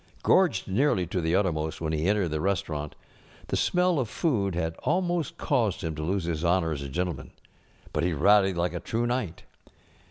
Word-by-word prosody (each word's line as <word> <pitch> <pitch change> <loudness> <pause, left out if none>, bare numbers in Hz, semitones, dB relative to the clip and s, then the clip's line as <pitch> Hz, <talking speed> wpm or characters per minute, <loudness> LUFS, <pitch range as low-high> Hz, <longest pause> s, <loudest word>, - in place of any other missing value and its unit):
Gorged 165 - +3
nearly 100 -1 +2
to 90 +2 -2
the 80 +2 +1
uttermost 80 -5 0
when 80 -1 -2
he 80 +2 0
entered 100 -3 +2
the 75 0 -2
restaurant, 80 -6 -2 0.5
the - - 0
smell 180 -3 +2
of 120 -5 -1
food 100 - 0
had 80 -1 -2
almost 175 -3 -1
caused 120 - 0
liim 80 -1 -3
to 75 - -5
lose 95 +4 -1
his 85 -1 -2
honor 85 -1 +2
as 70 -3 -3
a 70 - -5
gentleman, 85 -2 -3 0.6
but - - 0
he 90 - +1
rallied 95 +4 +4
like 85 +1 0
a 85 - -3
true 115 +6 -2
knight. 120 -9 -2
90 Hz, 190 wpm, -27 LUFS, 80-115 Hz, 0.6 s, rallied